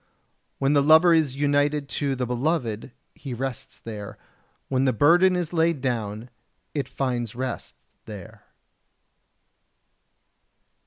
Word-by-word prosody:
When 140 Hz, +1 st, +2 dB
the 145 Hz, -, +4 dB
lover 160 Hz, +4 st, +6 dB
is 155 Hz, -5 st, +2 dB
united 145 Hz, 0 st, +1 dB
to 140 Hz, -2 st, -1 dB
the 125 Hz, -1 st, -2 dB
beloved 125 Hz, -2 st, -2 dB, 0.2 s
he 135 Hz, -4 st, -7 dB
rests 130 Hz, -1 st, -5 dB
there; 105 Hz, -3 st, -8 dB, 0.5 s
when 130 Hz, 0 st, +1 dB
the 130 Hz, -, +2 dB
burden 175 Hz, -, +5 dB
is 175 Hz, -2 st, -2 dB
laid 165 Hz, -2 st, +2 dB
down 115 Hz, -3 st, -3 dB, 0.4 s
it 140 Hz, -4 st, -2 dB
finds 120 Hz, -5 st, -2 dB
rest 130 Hz, 0 st, -5 dB, 0.3 s
there. 105 Hz, -4 st, -10 dB
135 Hz, 115 wpm, -25 LUFS, 120-150 Hz, 0.5 s, lover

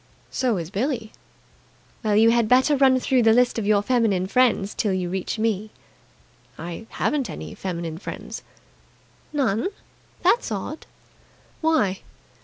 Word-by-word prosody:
"So 245 Hz, -6 st, 0 dB
is 170 Hz, 0 st, -5 dB
Billie." 225 Hz, +1 st, -2 dB, 0.9 s
"Well, 215 Hz, -2 st, +2 dB
you 225 Hz, +2 st, +6 dB
had 235 Hz, -2 st, +2 dB
better 260 Hz, +4 st, +5 dB
run 265 Hz, -1 st, +4 dB
through 255 Hz, 0 st, +2 dB
the 225 Hz, -1 st, +5 dB
list 245 Hz, 0 st, +3 dB
of 205 Hz, -, -3 dB
your 205 Hz, -1 st, +3 dB
feminine 215 Hz, -6 st, +2 dB
friends 220 Hz, -2 st, +2 dB
till 205 Hz, -4 st, 0 dB
you 180 Hz, -2 st, -2 dB
reach 190 Hz, +3 st, -3 dB
me." 215 Hz, -1 st, -1 dB, 0.9 s
"I 170 Hz, +7 st, -7 dB
haven't 285 Hz, -4 st, -1 dB
any -, -, -7 dB
feminine 170 Hz, -3 st, -5 dB
friends." -, -, -7 dB, 0.9 s
"None?" 255 Hz, -, +1 dB, 0.6 s
"That's 475 Hz, -, +3 dB
odd." 215 Hz, +10 st, -5 dB, 0.7 s
"Why?" 310 Hz, -, +2 dB
220 Hz, 135 wpm, -23 LUFS, 195-255 Hz, 0.9 s, you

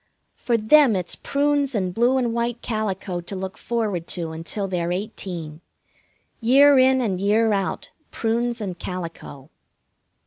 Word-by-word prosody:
For 235 Hz, -2 st, 0 dB
them 235 Hz, +2 st, +5 dB
it's 180 Hz, -2 st, -2 dB
prunes 285 Hz, -2 st, 0 dB
and 185 Hz, -3 st, -1 dB
blue 240 Hz, +5 st, +2 dB
and 240 Hz, -3 st, 0 dB
white 235 Hz, 0 st, -2 dB
calico 195 Hz, -5 st, -3 dB
to 185 Hz, +3 st, -7 dB
look 190 Hz, 0 st, -5 dB
forward 210 Hz, -8 st, -2 dB
to 165 Hz, -3 st, -4 dB
until 165 Hz, +5 st, -4 dB
they're 175 Hz, -2 st, -2 dB
eighteen. 175 Hz, -5 st, -5 dB, 0.8 s
Year 270 Hz, +4 st, +6 dB
in 260 Hz, 0 st, +4 dB
and 190 Hz, -6 st, -1 dB
year 215 Hz, +2 st, +3 dB
out, 195 Hz, -1 st, -2 dB, 0.2 s
prunes 235 Hz, +1 st, -1 dB
and 185 Hz, -4 st, -5 dB
calico. 165 Hz, -6 st, -7 dB
210 Hz, 140 wpm, -23 LUFS, 180-240 Hz, 0.8 s, Year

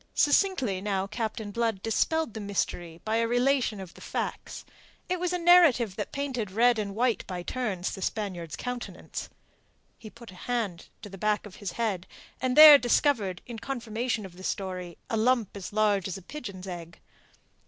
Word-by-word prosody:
Succinctly 285 Hz, -, +2 dB
now 195 Hz, -1 st, -1 dB
Captain 215 Hz, 0 st, -4 dB
Blood 225 Hz, -3 st, -1 dB
dispelled 305 Hz, +5 st, 0 dB
the 220 Hz, -, -6 dB
mystery 175 Hz, -5 st, -3 dB
by 220 Hz, +1 st, +1 dB
a 230 Hz, 0 st, +2 dB
relation 245 Hz, -2 st, +1 dB
of 185 Hz, -3 st, -9 dB
the -, -, -15 dB
facts. -, -, -4 dB, 0.4 s
It 365 Hz, 0 st, -1 dB
was 360 Hz, 0 st, -1 dB
a 360 Hz, -, 0 dB
narrative 335 Hz, -, +5 dB
that 210 Hz, -, -4 dB
painted 260 Hz, -7 st, -3 dB
red 235 Hz, +4 st, +3 dB
and 200 Hz, -2 st, -3 dB
white 240 Hz, 0 st, +1 dB
by 180 Hz, -2 st, -5 dB
turns 200 Hz, -6 st, -2 dB
the 190 Hz, -, -7 dB
Spaniard's 180 Hz, -6 st, -3 dB
countenance. 250 Hz, -1 st, -6 dB, 0.7 s
He 220 Hz, -, -10 dB
put 235 Hz, -2 st, -13 dB
a 185 Hz, +6 st, -12 dB
hand 215 Hz, -9 st, -2 dB, 0.2 s
to 205 Hz, -, -7 dB
the 195 Hz, -1 st, -10 dB
back 210 Hz, +1 st, 0 dB
of 205 Hz, -, -11 dB
his 200 Hz, -4 st, -5 dB
head, 205 Hz, -6 st, -2 dB, 0.3 s
and 255 Hz, +1 st, 0 dB
there 305 Hz, -2 st, +12 dB
discovered, 235 Hz, -, +1 dB
in 235 Hz, -2 st, -7 dB
confirmation 230 Hz, -3 st, -3 dB
of 180 Hz, -2 st, -12 dB
the 185 Hz, -, -11 dB
story, 185 Hz, -3 st, -4 dB
a 225 Hz, -, -1 dB
lump 230 Hz, -2 st, +1 dB
as 195 Hz, -2 st, -7 dB
large 205 Hz, -3 st, +2 dB
as 190 Hz, 0 st, -4 dB
a 195 Hz, -, -12 dB
pigeon's 200 Hz, -7 st, -8 dB
egg. 170 Hz, -3 st, -8 dB
215 Hz, 180 wpm, -28 LUFS, 190-245 Hz, 0.7 s, there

